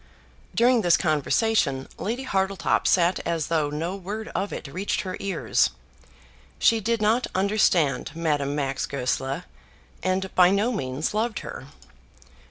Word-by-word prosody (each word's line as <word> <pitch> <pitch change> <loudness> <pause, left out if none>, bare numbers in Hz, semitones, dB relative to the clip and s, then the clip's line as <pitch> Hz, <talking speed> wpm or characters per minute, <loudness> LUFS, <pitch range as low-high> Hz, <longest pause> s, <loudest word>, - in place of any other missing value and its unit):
During 240 0 +4
this 175 -4 +4
conversation 155 - +1
Lady 235 +8 -3
Hartletop 195 -6 0
sat 180 0 +3
as 165 -3 -2
though 155 -3 +1
no 165 +5 -3
word 205 +3 -6
of 195 +3 -3
it - - -6
reached 185 +9 -2
her 185 -2 -5
ears. 195 -4 +1 0.9
She 230 - +4
did 225 +1 0
not 225 +4 +2
understand 185 -9 +2
Madame 145 -4 0
Max 135 -2 -2
Goesler, 135 +3 -2 0.6
and 185 +1 -1
by 180 -1 +6
no 205 +5 +2
means 140 - -2
loved 220 +1 -1
her. 130 - -8
185 Hz, 135 wpm, -25 LUFS, 150-210 Hz, 0.9 s, by